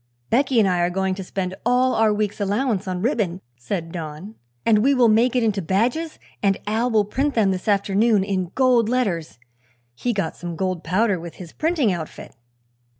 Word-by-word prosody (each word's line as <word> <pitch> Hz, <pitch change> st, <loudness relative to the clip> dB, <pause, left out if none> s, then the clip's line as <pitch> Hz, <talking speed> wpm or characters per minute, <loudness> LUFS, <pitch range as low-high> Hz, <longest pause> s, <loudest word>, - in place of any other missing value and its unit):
"Becky 260 Hz, 0 st, +3 dB
and 210 Hz, -, +4 dB
I 180 Hz, -1 st, +1 dB
are 175 Hz, 0 st, +2 dB
going 190 Hz, +1 st, -1 dB
to 190 Hz, +1 st, -6 dB
spend 185 Hz, 0 st, -4 dB
all 250 Hz, +2 st, +2 dB
our 220 Hz, -1 st, +3 dB
week's 210 Hz, 0 st, -2 dB
allowance 205 Hz, 0 st, 0 dB
on 185 Hz, 0 st, -3 dB
ribbon," 210 Hz, -, 0 dB, 0.2 s
said 165 Hz, +7 st, -4 dB
Don, 165 Hz, +4 st, -7 dB, 0.3 s
"and 220 Hz, -2 st, +4 dB
we 275 Hz, +6 st, +3 dB
will 245 Hz, -2 st, +5 dB
make 230 Hz, +4 st, +3 dB
it 245 Hz, -, +2 dB
into 210 Hz, -3 st, 0 dB
badges 240 Hz, -, 0 dB, 0.2 s
and 195 Hz, -1 st, +2 dB
Al 225 Hz, +4 st, 0 dB
will 215 Hz, -3 st, +2 dB
print 275 Hz, +7 st, -1 dB
them 210 Hz, -4 st, +3 dB
this 185 Hz, +2 st, -4 dB
afternoon 205 Hz, +1 st, +2 dB
in 185 Hz, -3 st, -2 dB
gold 250 Hz, -4 st, +3 dB
letters. 190 Hz, -, -1 dB, 0.6 s
He 245 Hz, -, -2 dB
got 195 Hz, -7 st, -2 dB
some 175 Hz, -1 st, -6 dB
gold 185 Hz, 0 st, -2 dB
powder 190 Hz, +2 st, +1 dB
with 170 Hz, 0 st, -9 dB
his 175 Hz, -3 st, -11 dB
printing 310 Hz, -, +1 dB
outfit." 165 Hz, -8 st, -7 dB
205 Hz, 190 wpm, -22 LUFS, 185-235 Hz, 0.6 s, will